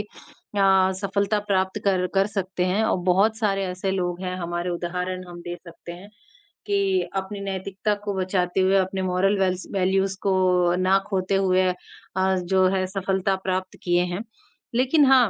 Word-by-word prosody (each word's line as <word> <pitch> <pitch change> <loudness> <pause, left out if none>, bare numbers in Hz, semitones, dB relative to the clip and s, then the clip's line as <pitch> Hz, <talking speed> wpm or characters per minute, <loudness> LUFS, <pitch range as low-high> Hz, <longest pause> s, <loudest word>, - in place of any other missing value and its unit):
अ, 195 -2 0
सफलता 200 +1 0
प्राप्त 190 -1 +1
कर 185 -2 +2
कर 195 0 +3
सकते 190 -3 -2
हैं 195 +4 +1
और - - +2
बहुत 210 +5 +3
सारे 195 -3 0
ऐसे 185 +1 -3
लोग 180 -2 -2
हैं 185 0 -3
हमारे 175 +1 -3
उदाहरण 180 +1 -3
हम 175 0 -9
दे 175 0 -5
सकते 170 0 -10
हैं, 180 +4 -11 0.6
कि 395 -2 +1
अपनी 195 +1 -3
नैतिकता 195 +1 -2
को 205 - -1
बचाते 185 -1 0
हुए, 190 +1 +3
अपने 190 0 0
मोरल 185 +2 +1
वेल्स 185 -1 0
वैल्यूज 195 0 +1
को 180 -2 +2
ना 185 +1 +3
खोते 190 -1 0
हुए 185 -1 +3
अ, 180 - -2 0.6
जो 185 +1 +2
है 185 -1 +1
सफलता 190 0 0
प्राप्त 185 0 -2
किए 175 0 +2
हैं। 190 +5 -3 0.5
लेकिन 265 +5 +4
हाँ 260 -4 +6
190 Hz, 165 wpm, -24 LUFS, 180-195 Hz, 0.6 s, हाँ